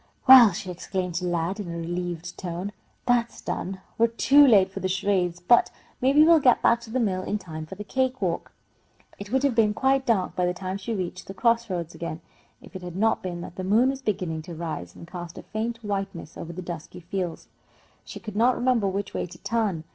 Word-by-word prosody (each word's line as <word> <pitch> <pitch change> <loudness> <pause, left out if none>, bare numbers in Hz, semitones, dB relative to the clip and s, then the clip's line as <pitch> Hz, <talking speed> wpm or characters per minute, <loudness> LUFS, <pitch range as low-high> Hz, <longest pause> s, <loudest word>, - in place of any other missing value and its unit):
"Well," 255 -5 +10
she 185 0 -5
exclaimed 180 0 -4
to 180 +1 -1
Lad, 175 +3 -1
in 195 -4 -5
a 170 - -5
relieved 175 0 -4
tone, 180 +2 -5 0.3
"that's 240 -1 +1
done! 190 0 -4 0.2
We're 230 - +6
too 275 +5 +5
late 195 -6 +5
for - - -6
the 185 - -1
charades, 185 -2 0
but 205 +7 +4 0.3
maybe 275 +4 +5
we'll 330 0 +6
get 255 -4 +4
back 235 0 +4
to 235 - -11
the 255 +3 -1
mill 190 -6 0
in 205 +3 -2
time 160 -5 -8
for 190 - -8
the 210 - -7
cake 260 +4 -1
walk." 180 -4 -2 0.7
It 200 +1 -8
would 265 +1 +1
have 280 -3 +3
been 215 -2 +3
quite 270 +1 +2
dark 200 -6 +1
by 180 -1 +1
the 180 - -1
time 185 +1 -4
she 225 +3 -3
reached 185 -1 -5
the 195 - -8
cross 235 +2 +2
roads 170 -3 -3
again, 165 -1 -5 0.4
if - - -15
it 185 - -6
had 175 -1 -7
not 220 +3 +2
been 175 -2 -5
that 175 - -9
the 185 - -4
moon 225 +8 +3
was 270 0 -7
beginning 180 -9 -2
to 170 - -6
rise, 155 - -5
and 170 - -11
cast 175 -1 -8
a - - -8
faint 230 +2 -4
whiteness 195 -5 -4
over 170 - -7
the 180 +2 -7
dusky 175 +1 -7
fields. 175 -1 -4 0.6
She - - -9
could 215 -3 -8
not 240 +3 +4
remember 245 -5 +2
which 195 +1 -3
way - - -2
to 175 0 -12
turn. 210 -8 0
195 Hz, 225 wpm, -25 LUFS, 175-230 Hz, 0.7 s, Well